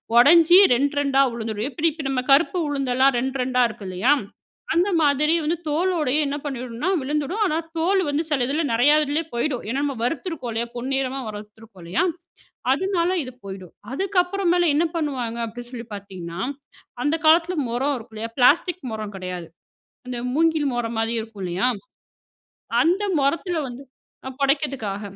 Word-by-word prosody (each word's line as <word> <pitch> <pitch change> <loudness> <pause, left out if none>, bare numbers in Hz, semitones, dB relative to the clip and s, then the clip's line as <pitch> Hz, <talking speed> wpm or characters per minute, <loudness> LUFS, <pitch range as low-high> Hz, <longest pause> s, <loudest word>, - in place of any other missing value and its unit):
உடைஞ்சு 330 +7 +7 0.2
ரெண்ட் 280 +4 +1
2டா 275 -1 +3
விழுந்துரும். 220 -1 -3
எப்படி 330 +3 +1
இப்ப 305 -1 -8
நம்ம 260 -2 0
கருப்பு 320 +6 +4
உளுந்தெல்லாம் 270 -1 +2
ரெண்ட் 265 +2 -2
2டா 250 0 +1
இருக்கு 215 -3 -10
இல்லையா, 185 +9 +1 0.6
அந்த 350 +4 +2
மாதிரி 300 +1 +3
வந்து 330 +3 0
தோலோடயே 310 -3 +1
என்ன 285 +1 -2
பண்ணிடும்னா 255 +2 -3
விழுந்துடும். 300 +9 -2
ஆனா 315 -5 0 0.2
தோலு 375 +4 +2
வந்து 290 +3 0
சில 270 -5 +1
இதில 295 +3 0
நிறையா 265 +6 +5
இதுலயே 300 +3 -1
போயிடும், 245 +1 -1
ஏன்னா 270 +4 -1
நம்ம 285 -2 -1
வறுத்துருக்கோம் 290 -2 -3
இல்லையா, 235 +1 -2
பொன்னிறமா 265 +1 -1
வறுத்துருக்கோம் 210 -2 -11
இல்லையா, 180 - 0 0.7
அதனால 355 +3 +1
இது 255 - -8
போயிடும். 190 -3 -9 0.2
அதுக்கப்புற 380 +4 0
மேல 350 0 +3
என்ன 320 +4 +3
பண்ணுவாங்க 255 -7 -2
அப்படின்னு 240 +2 -9
சொல்லி 235 -2 -7
பார்த்தீங்கன்னா, 185 -3 -8 0.6
அந்த 295 +1 +2
காலத்தில 335 +3 +5
முறம் 265 +5 0
இருக்கும் 225 -2 -11
இல்லையா, 225 +1 -5
பிளாஸ்டிக் 340 +8 +3
முறம் 215 -2 -5
கிடையாது, 180 -2 -6 0.6
அந்த 250 -1 -4 0.2
மூங்கில் 315 -2 +2
முறம் 235 -1 -2
மாதிரி 225 +1 0
இருக்கும் 220 -3 -9
இல்லையா? 180 +6 0 1.2
அந்த 355 +5 +2 0.2
முறத்தில 325 +4 0
வந்து 245 +2 -9 0.5
அ - - -5
புடைக்கிறதுக்காக 275 -8 0
270 Hz, 155 wpm, -23 LUFS, 230-315 Hz, 1.2 s, உடைஞ்சு